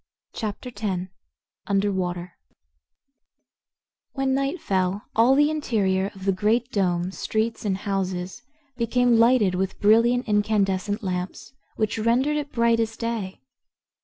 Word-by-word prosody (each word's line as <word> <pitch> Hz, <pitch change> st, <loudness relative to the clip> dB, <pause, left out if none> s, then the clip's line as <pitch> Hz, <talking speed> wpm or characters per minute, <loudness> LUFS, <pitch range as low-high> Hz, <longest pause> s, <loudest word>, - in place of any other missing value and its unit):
Chapter 220 Hz, +3 st, -5 dB
Ten 190 Hz, -5 st, -3 dB, 0.6 s
Under 200 Hz, +1 st, +1 dB
Water 180 Hz, -2 st, -3 dB, 1.8 s
When 270 Hz, -1 st, 0 dB
night 275 Hz, +6 st, -1 dB
fell 190 Hz, -6 st, -1 dB
all 235 Hz, +4 st, +5 dB
the 295 Hz, +2 st, +4 dB
interior 200 Hz, -10 st, 0 dB
of 190 Hz, 0 st, -10 dB
the 195 Hz, -, +3 dB
Great 220 Hz, +6 st, 0 dB
Dome, 180 Hz, -3 st, 0 dB
streets 220 Hz, +3 st, -2 dB
and 190 Hz, -2 st, 0 dB
houses, 190 Hz, +1 st, -3 dB, 0.4 s
became 240 Hz, 0 st, +2 dB
lighted 230 Hz, -5 st, +4 dB
with 190 Hz, +1 st, -2 dB
brilliant 235 Hz, +4 st, +4 dB
incandescent 205 Hz, -1 st, 0 dB
lamps, 180 Hz, +5 st, -4 dB, 0.2 s
which 215 Hz, 0 st, -1 dB
rendered 250 Hz, +7 st, +2 dB
it 290 Hz, -1 st, -4 dB
bright 235 Hz, -1 st, +2 dB
as 225 Hz, -1 st, -1 dB
day. 225 Hz, -, -4 dB
210 Hz, 125 wpm, -24 LUFS, 190-235 Hz, 1.8 s, all